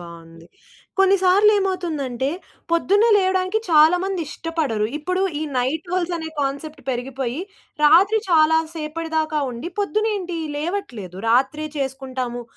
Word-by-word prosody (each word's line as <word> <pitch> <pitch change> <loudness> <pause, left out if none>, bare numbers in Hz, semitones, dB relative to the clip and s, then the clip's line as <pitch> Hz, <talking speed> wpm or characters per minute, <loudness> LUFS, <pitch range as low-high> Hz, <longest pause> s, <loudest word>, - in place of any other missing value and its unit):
బావుంది. 165 -1 -12 0.5
కొన్ని 390 0 +5
సార్లు 390 +3 +5
ఏమవుతుందంటే, 310 -10 -2 0.4
పొద్దున్నే 400 +6 +3
లేవడానికి 375 +1 +1
చాలా 315 +3 +6
మంది 385 -2 -2
ఇష్టపడరు. 300 -12 -2
ఇప్పుడు 365 +5 -1 0.2
ఈ - - -2 0.2
నైట్ 300 +7 -2
హోల్డ్స్ 355 -1 0
అనే 320 -1 -5
కాన్సెప్ట్ 285 +2 -4
పెరిగిపోయి, 255 +2 -3 0.4
రాత్రి 380 +8 +6
చాలా 320 -1 +5 0.2
సేపటి 320 +1 -5
దాకా 310 -1 0
ఉండి 250 +9 -6
పొద్దున్న 430 +2 0
ఏంటి 360 -3 -5 0.2
లేవట్లేదు. 255 - -4
రాత్రే 270 +6 +2
చేసుకుంటాము. 260 -3 -4
315 Hz, 125 wpm, -21 LUFS, 265-365 Hz, 0.5 s, చాలా